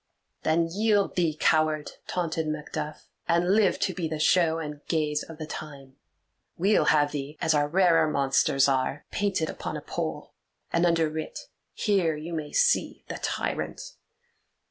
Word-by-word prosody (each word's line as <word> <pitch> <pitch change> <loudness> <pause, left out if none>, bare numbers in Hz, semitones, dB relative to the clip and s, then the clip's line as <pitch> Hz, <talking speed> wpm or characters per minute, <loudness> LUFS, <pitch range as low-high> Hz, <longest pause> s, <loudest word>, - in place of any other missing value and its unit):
"Then 165 +1 +2
yield 205 +3 +1
thee, 165 -4 +1
coward!" 155 -1 +2 0.2
taunted 165 -3 -2
Macduff, 150 0 -5 0.2
"and 175 +3 +3
live 210 -2 +3
to 185 - +1
be 175 -3 -2
the 155 0 -3
show 165 +1 +3
and 150 -2 -6
gaze 150 -2 0
of 165 - -9
the 155 - -5
time; 140 -4 -9 0.6
we'll 200 +5 +3
have 145 -1 +3
thee, 145 +1 -5
as 160 - +2
our 145 -1 +2
rarer 170 -1 +4
monsters 135 -1 +2
are, 135 +1 0
painted 195 -6 0
upon - - -5
a - - -7
pole, - - -5 0.4
and 170 +1 +3
underwrit, 160 -2 -1 0.3
'Here 190 -7 +1
you 160 +3 -6
may 155 -2 -4
see 485 0 +1
the - - -5
tyrant. - - -3
160 Hz, 150 wpm, -27 LUFS, 150-175 Hz, 0.6 s, rarer